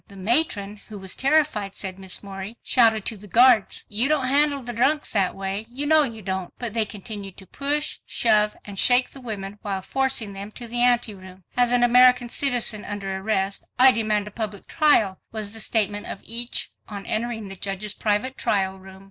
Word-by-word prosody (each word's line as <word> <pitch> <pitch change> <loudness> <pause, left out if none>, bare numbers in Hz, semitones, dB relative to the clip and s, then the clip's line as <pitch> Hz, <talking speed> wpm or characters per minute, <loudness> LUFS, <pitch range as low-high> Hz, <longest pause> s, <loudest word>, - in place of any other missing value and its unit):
"The 200 - -15
Matron, 210 -1 +1
who 210 - -9
was 190 -2 -5
terrified," 275 -9 +1
said 190 -1 -5
Miss 190 +1 -3
Morey, 195 +3 -8
"shouted 225 -4 +3
to 220 - -3
the 205 +1 -13
guards, 235 0 +4
'You 225 +6 +2
don't 300 -4 +1
handle 285 0 +2
the 240 0 -5
drunks 285 +6 0
that 195 -3 +1
way. 195 +3 -4
You 270 +4 -4
know 310 +1 +5
you 230 -7 -4
don't.' 190 -1 -4
But 235 -4 -4
they 225 -2 +3
continued 205 -2 -8
to 190 - -12
push, 290 - -1
shove 210 -2 +2
and 200 -2 -6
shake 250 0 +4
the 270 - -11
women 205 -4 -7
while 195 -2 -4
forcing 265 -4 0
them 200 +2 -8
to 240 - -7
the 240 +1 -1
ante 240 -3 +3
room." 185 -1 -14
"As 245 -1 +2
an 245 0 +3
American 250 0 +5
citizen 240 -6 +1
under 195 -2 -5
arrest, 195 0 -1
I 260 +1 +8
demand 215 -3 -1
a - - -8
public 210 -2 -5
trial," 260 - +2
was 215 -2 -4
the 225 - -4
statement 210 -2 0
of - - -5
each 235 +1 -1 0.2
on 200 -2 -7
entering 225 -1 -3
the 195 - -6
judge's 195 +2 -4
private 215 +6 -1
trial 190 -2 0
room. 190 0 -14
215 Hz, 200 wpm, -23 LUFS, 195-245 Hz, 0.2 s, I